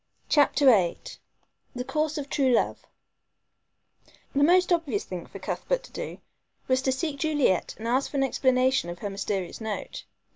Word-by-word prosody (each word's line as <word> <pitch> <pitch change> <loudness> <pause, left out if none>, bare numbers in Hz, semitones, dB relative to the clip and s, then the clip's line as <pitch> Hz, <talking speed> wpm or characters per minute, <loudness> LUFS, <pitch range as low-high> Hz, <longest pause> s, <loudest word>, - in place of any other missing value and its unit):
CHAPTER 290 -1 +3
VIII 195 -10 +5 0.8
THE 250 - -3
COURSE 310 +3 -1
OF 285 -2 -4
TRUE 265 -3 +2
LOVE - - 0 1.5
The 285 - +3
most 360 +3 +5
obvious 290 -12 0
thing 180 -2 -7
for - - -10
Cuthbert - - -2
to - - -14
do - - -6 0.5
was 260 0 +2
to 265 - +1
seek 280 +1 -3
Juliet 295 - +1
and 225 - -6
ask 255 +3 +1
for 285 - -4
an 270 - +3
explanation 260 -6 +2
of 175 - -6
her 200 +3 -5
mysterious 195 -1 -3
note. 220 -2 -5
265 Hz, 160 wpm, -26 LUFS, 220-295 Hz, 1.5 s, VIII